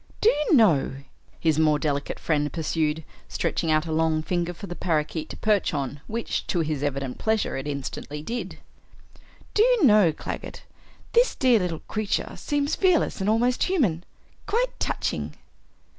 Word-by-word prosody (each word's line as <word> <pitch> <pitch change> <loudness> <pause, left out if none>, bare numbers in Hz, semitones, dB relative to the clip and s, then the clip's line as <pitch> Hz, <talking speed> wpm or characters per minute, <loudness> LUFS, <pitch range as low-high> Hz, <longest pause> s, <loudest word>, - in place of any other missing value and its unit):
"Do 440 - +5
you 300 +2 +2
know," 175 - +4 0.4
his 160 -2 +2
more 155 -1 +4
delicate 145 -1 -2
friend 150 -2 0
pursued, 160 -1 -1 0.3
stretching 165 - -1
out 155 +1 +2
a 160 - -4
long 160 0 +1
finger 175 +1 -1
for 175 +3 -9
the 175 -2 -6
parakeet 155 -2 -1
to - - -8
perch 210 -6 +1
on, 140 0 -3
which 230 +1 -3
to 175 - +1
his 155 -3 -2
evident 140 -3 -3
pleasure 220 -1 0
it 135 +2 -4
instantly 145 +1 -5
did, 235 +8 -5 1.0
"Do 420 - +3
you 485 -3 +4
know, 210 -8 +6
Claggett, 150 - -7 0.5
this 480 +1 +4
dear 250 -4 +4
little 175 -4 -3
creature 215 -2 -2
seems 290 0 -1
fearless 365 - +2
and 195 - +1
almost 240 +3 +2
human? 225 - +1 0.4
Quite - - 0
touching." - - -2
170 Hz, 160 wpm, -25 LUFS, 155-230 Hz, 1.0 s, know